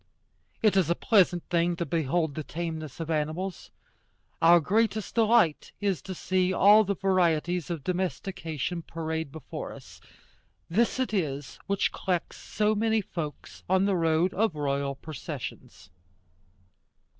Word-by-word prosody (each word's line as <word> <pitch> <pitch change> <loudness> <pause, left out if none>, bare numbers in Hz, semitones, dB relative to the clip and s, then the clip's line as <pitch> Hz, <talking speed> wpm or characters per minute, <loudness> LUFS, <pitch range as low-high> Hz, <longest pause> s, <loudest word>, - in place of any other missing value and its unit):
It 215 -3 +4
is 185 -5 +3
a 170 - +3
pleasant 180 -6 +3
thing 170 0 +2
to 170 0 -2
behold 160 -1 0
the 155 - -4
tameness 160 -2 -5
of 165 0 -3
animals. 160 +5 -2 0.7
Our 170 +1 +7
greatest 215 +5 0
delight 225 -8 +3
is 200 -4 0
to 190 - -7
see 185 +1 +1
all 205 +3 +6
the 200 0 -1
varieties 175 -3 +1
of 165 -5 -4
domestication 180 -3 -3
parade 160 -2 -4
before 160 0 -7
us. - - -13 0.7
This 230 +8 +1
it 255 -4 -1
is 145 -8 -2
which 200 -1 +1
collects 180 -3 -2
so 210 0 0
many 220 +1 +1
folks 165 -6 -7
on 190 +1 +3
the 200 -1 +2
road 165 +1 +2
of 215 -4 +1
royal 140 -1 -1
processions. 155 0 -8
175 Hz, 135 wpm, -28 LUFS, 160-195 Hz, 0.7 s, Our